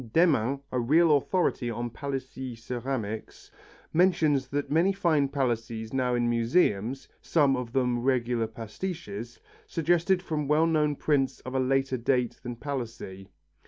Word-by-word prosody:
Demmin, 140 -6 +3
a 125 - 0
real 155 +6 +4
authority 140 -4 0
on 120 +1 -3
Palissy 130 -1 -5
ceramics, 115 -2 -5 0.4
mentions 155 -6 +3 0.2
many 165 +6 +3
false 160 -8 +2
Palissys 115 -4 -2
now 125 -2 +1
in 120 0 +1
museums, 120 - +1
some 145 -5 +3
of 125 -2 -4
them 125 -1 +1
regular 120 -3 +1
pastiches, 115 - -6 0.3
suggested 175 +3 +1
from 150 -5 -2
well 150 +2 +4
known 150 -3 +2
prints 140 -2 0
of 130 - -7
a 135 - +1
later 130 0 +1
date 125 0 0
than 120 -1 -5
Palissy. 115 -8 -6
130 Hz, 130 wpm, -28 LUFS, 120-150 Hz, 0.4 s, real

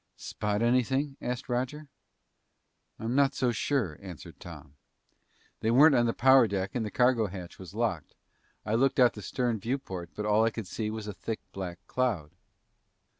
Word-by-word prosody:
"Spot 105 +1 -2
anything?" 130 +4 +1
asked 125 0 -3
Roger. 130 +5 -2 1.1
"I'm 115 +2 -3
not 140 0 +3
so 125 -2 +1
sure," 115 - -1
answered 90 -5 -10
Tom. 70 - -11 0.9
"They 110 - 0
weren't 140 +6 +7
on 120 -2 +3
the - - +2
power 130 -1 +6
deck 95 -1 -2
and 120 - -1
the 105 - -3
cargo 125 -1 +3
hatch 90 -2 -9
was 95 0 -10
locked. 110 -9 -2 0.5
I 105 - -1
looked 135 +4 +2
out 125 -2 +6
the 105 - -9
stern 120 +2 -1
viewport, 95 -7 -4
but 105 - -3
all 105 +1 +4
I 115 - +4
could 115 -1 -6
see 105 +3 -3
was 110 -1 -5
a 105 - -5
thick 110 +2 -4
black 90 -2 -5
cloud." 105 -13 -1
115 Hz, 175 wpm, -29 LUFS, 100-125 Hz, 1.1 s, weren't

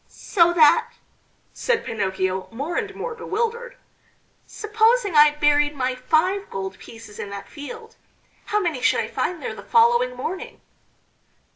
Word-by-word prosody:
"So 345 -3 +2
that," 310 -4 +4 0.6
said 470 -2 -1
Pinocchio, 190 -3 -2
more 280 +9 -4
and 410 -3 -3
more 485 - -5
bewildered, 465 +2 -3 0.7
"supposing 440 -1 +1
I 300 0 +7
buried 295 0 +2
my 260 -1 -1
five 320 +10 0
gold 190 0 -6
pieces 225 -2 -12
in 200 - -5
that 200 0 -8
field, 445 +10 -10 0.5
how 420 - 0
many 330 -10 -2
should - - +3
I - - -4
find 360 -2 -3
there - - -4
the - - -10
following 475 +2 +3
morning?" 370 +3 -6
335 Hz, 140 wpm, -23 LUFS, -, 0.7 s, I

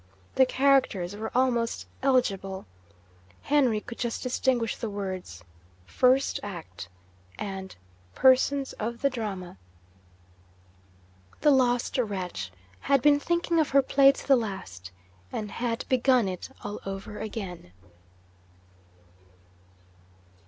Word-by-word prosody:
The 260 - +5
characters 255 -10 +2
were 220 +1 -4
almost 240 -2 +1 0.2
illegible. 195 -8 0 0.8
Henry 265 -7 +3
could 235 +2 -10
just 235 -2 -2
distinguish 250 -2 0
the 225 - -4
words, 185 - -6 0.4
'First 260 - +2
Act,' 165 - -8 0.5
and 190 -1 -6 0.4
'Persons 265 +1 +3
of 235 +3 -4
the 275 - +3
Drama.' 195 - -5 1.8
The 295 - +5
lost 250 -1 +2
wretch 180 - -3 0.3
had 275 -3 +2
been 290 -1 +5
thinking 340 +1 0
of 310 - +2
her 275 0 +4
Play 275 +1 +6
to - - -10
the 275 - +7
last, 190 - -5 0.4
and 210 -2 -4
had 230 0 -2
begun 255 -3 +3
it 185 -1 -5
all 205 0 -5
over 195 +2 -6
again! 190 - -6
230 Hz, 110 wpm, -27 LUFS, 195-265 Hz, 1.8 s, the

